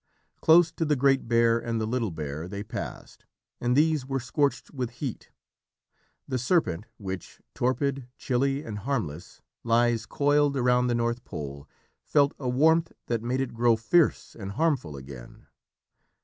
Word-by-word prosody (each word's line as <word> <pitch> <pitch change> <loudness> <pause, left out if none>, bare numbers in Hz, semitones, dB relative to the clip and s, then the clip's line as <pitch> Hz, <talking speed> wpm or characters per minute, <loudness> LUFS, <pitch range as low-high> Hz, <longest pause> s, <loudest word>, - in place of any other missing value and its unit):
Close 165 0 +6
to - - -2
the 150 -2 +2
Great 135 -1 +2
Bear 115 0 +3
and 115 -1 -2
the 110 - -1
Little 115 -1 -1
Bear 80 0 -5
they 100 +2 -5
passed, 110 - -7 0.4
and 120 +1 +1
these 155 -2 +3
were 135 +1 -2
scorched 140 +4 -1
with 125 -4 -2
heat. 130 -5 -5 1.0
The 130 -2 -1
Serpent 115 - +1
which, 95 -3 -7
torpid, 130 +1 -1
chilly 135 +2 0
and 105 -2 -6
harmless, 105 - -4 0.2
lies 115 -1 +2
coiled 145 +1 +2
round 125 -1 +2
the 120 - +1
North 120 +1 -1
Pole, 70 0 -7 0.3
felt 145 -1 +3
a 130 -3 -2
warmth 160 +6 +3
that 115 -2 -1
made 125 +3 -1
it 135 - -3
grow 115 0 +3
fierce 150 +9 +2
and 100 -3 -6
harmful 130 - 0
again. 65 -2 -11
120 Hz, 150 wpm, -27 LUFS, 110-140 Hz, 1.0 s, Close